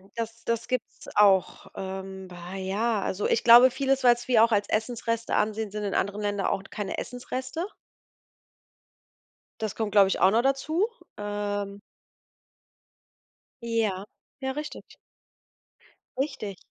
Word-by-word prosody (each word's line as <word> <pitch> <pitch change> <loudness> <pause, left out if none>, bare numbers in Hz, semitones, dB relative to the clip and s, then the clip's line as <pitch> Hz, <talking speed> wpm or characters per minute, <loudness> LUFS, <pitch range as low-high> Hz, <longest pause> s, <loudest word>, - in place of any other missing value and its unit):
das 230 0 -5
das 230 0 -1
gibt's 255 -3 -4
auch. 195 -3 +4
Ähm. 190 0 -6
Bah, 180 +1 -9
ja, 200 +3 0
also 190 +2 -1
ich - - +1
glaube 240 +2 +9
vieles, 270 0 0
was 240 -1 +4
wir 235 -3 +5
auch 230 - +3
als 205 -1 +2
Essensreste 230 +1 -1
ansehen, 215 0 0
sind 210 0 -4
in 200 - -2
anderen 200 +2 -1
Ländern 205 -1 -1
auch 195 - -1
t - - -16
keine 205 -2 -4
Essensreste. 255 +5 -4 2.0
Das 215 -2 -2
kommt, 220 -2 -2
glaube 200 -1 +6
ich, 190 - -1
auch 190 +2 +5
noch 230 - +4
dazu. 280 - +1 0.3
Ähm. 205 -1 -3 1.8
Ja, 220 -5 0 0.4
ja, 265 0 -1
richtig. 300 +1 -7 1.2
Richtig. 215 -8 -3
215 Hz, 135 wpm, -27 LUFS, 200-240 Hz, 2.0 s, glaube